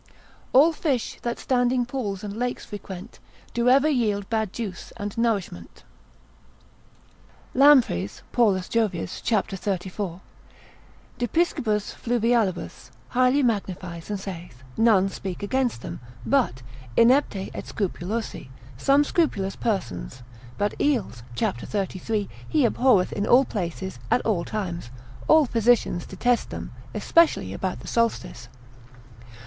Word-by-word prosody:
All 300 +6 +6
fish, 275 -7 -1
that 235 0 -2
standing 245 -1 +1
pools, 220 -7 -4
and 205 -1 -5
lakes 245 +2 -3
frequent, 200 0 -9 0.3
Do 240 +1 +2
ever 275 +4 +5
yield 215 -8 +1
bad 220 -3 0
juice 200 -6 -6
and 205 0 -5
nourishment. 205 - -2 1.7
Lampreys, 255 - +4
Paulus 200 -6 +2
Jovius, 210 -7 -1
c. 230 - +2
34. 190 -2 -4 1.0
de 240 - 0
piscibus 220 - 0
fluvial., 230 -4 +1 0.4
highly 255 +3 +3
magnifies, 185 -7 -2
and 205 -1 -2
saith, 175 -10 -8
None 215 -4 +4
speak 190 -1 -6
against 245 - 0
them, - - -6 0.3
but 125 +3 +1 0.3
inepti 230 -5 +3
et - - -6
scrupulosi, 200 - -3 0.3
some 275 - +4
scrupulous 210 - 0
persons; 125 - -3 0.3
but 205 0 0
eels, 250 - 0
c. - - +1
33, 200 - -3 0.2
he 300 -5 +3
abhorreth 235 -6 +3
in 205 +1 -1
all 260 +3 +6
places, 190 - -4
at - - +3
all 200 -6 +1
times, 175 - -4 0.4
all 315 -1 +6
physicians 230 -7 +2
detest 240 +5 0
them, - - -6 0.2
especially 335 -1 +3
about - - -3
the - - -11
solstice. 225 - -1
215 Hz, 120 wpm, -25 LUFS, 190-245 Hz, 1.7 s, All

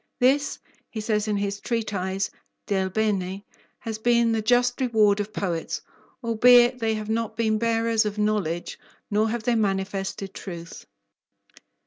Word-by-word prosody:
This, 275 +3 +2 0.3
he 220 - -6
says 215 0 0
in 210 -1 0
his 200 0 -2
treatise, 195 -5 -2 0.3
Del 190 -2 0
Bene, 195 -2 -1 0.3
has 220 -1 -6
been 235 0 +3
the 225 -1 +1
just 245 +3 +2
reward 215 -5 +3
of 205 +1 -3
poets, 175 -6 -3 0.4
albeit 240 +2 +5
they 225 -1 0
have 215 -1 -5
not 225 0 -2
been 220 -2 +1
bearers 230 -1 +2
of 210 -1 -3
knowledge, 205 -6 -1 0.3
nor 215 +2 +2
have 235 0 -3
they 245 - +2
manifested 195 -2 -2
truth. 170 -3 -8
215 Hz, 140 wpm, -25 LUFS, 200-230 Hz, 0.4 s, albeit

